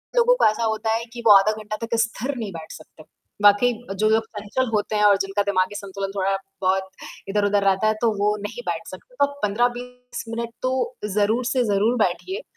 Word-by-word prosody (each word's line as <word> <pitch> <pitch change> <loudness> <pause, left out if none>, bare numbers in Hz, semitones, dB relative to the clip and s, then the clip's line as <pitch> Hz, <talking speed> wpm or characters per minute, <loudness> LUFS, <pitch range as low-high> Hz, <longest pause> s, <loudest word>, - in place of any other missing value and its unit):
लोगों - - +5
को - - +2
ऐसा 215 +2 +2
होता 220 0 0
है 230 +1 -2
कि 240 - -7
वो - - +8
आधा 195 +2 +5
घंटा 215 0 -5
तक 230 +1 -2
स्थिर 240 +4 -2
नहीं 220 -4 -4
बैठ 160 -1 -9
सकते। 155 0 -13 0.4
वाक़ई, 205 +4 +5 0.2
जो 215 +2 +2
लोग 220 +1 +2
चंचल 210 +5 -2
होते 210 0 0
हैं 210 - +2
और 205 -1 +6
जिनका 195 +1 -1
दिमागी 195 0 0
संतुलन 195 -1 -5
थोड़ा-बहुत 195 -1 -1 0.4
इधर-उधर 205 0 +1
रहता 195 +2 +2
है 215 - +3
तो 235 - +3
वो 205 +1 +2
नहीं 205 - -6
बैठ - - -3
सकते। - - -12
तो 285 - +3
आप 285 0 -10
15-20 245 +3 -2
मिनट 230 0 -3
तो 255 - 0 0.4
ज़रूर 215 +4 +1
से 255 0 +1
ज़रूर 215 +2 +2
बैठिए 295 - -1
215 Hz, 200 wpm, -23 LUFS, 200-240 Hz, 0.4 s, वो